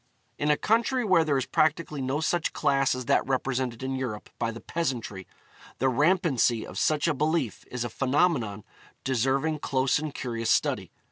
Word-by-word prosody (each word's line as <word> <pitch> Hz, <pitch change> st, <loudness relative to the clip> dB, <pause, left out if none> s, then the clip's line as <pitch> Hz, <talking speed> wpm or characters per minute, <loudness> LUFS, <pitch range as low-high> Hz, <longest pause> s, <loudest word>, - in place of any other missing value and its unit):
In 145 Hz, -, 0 dB
a 150 Hz, -, +4 dB
country 235 Hz, +3 st, +1 dB
where 185 Hz, -5 st, +4 dB
there 150 Hz, -3 st, +1 dB
is 130 Hz, -, -1 dB
practically 155 Hz, -1 st, +1 dB
no 135 Hz, +4 st, -1 dB
such 165 Hz, 0 st, 0 dB
class 135 Hz, -2 st, +2 dB
as 125 Hz, -1 st, -5 dB
that -, -, +3 dB
represented 130 Hz, -2 st, -1 dB
in 135 Hz, 0 st, -2 dB
Europe 125 Hz, -5 st, -5 dB
by 115 Hz, -, 0 dB
the 115 Hz, 0 st, -6 dB
peasantry, 120 Hz, -, -3 dB, 0.5 s
the 130 Hz, -, +2 dB
rampancy 145 Hz, -, +2 dB
of 95 Hz, -, -6 dB
such 150 Hz, +7 st, +2 dB
a 165 Hz, -, +2 dB
belief 150 Hz, -4 st, -1 dB
is 125 Hz, -1 st, -3 dB
a 120 Hz, -, -3 dB
phenomenon 130 Hz, -, +1 dB, 0.4 s
deserving 135 Hz, +5 st, 0 dB
close 135 Hz, 0 st, +1 dB
and 155 Hz, 0 st, -4 dB
curious 115 Hz, -3 st, -3 dB
study. -, -, +1 dB
135 Hz, 175 wpm, -27 LUFS, 125-155 Hz, 0.5 s, a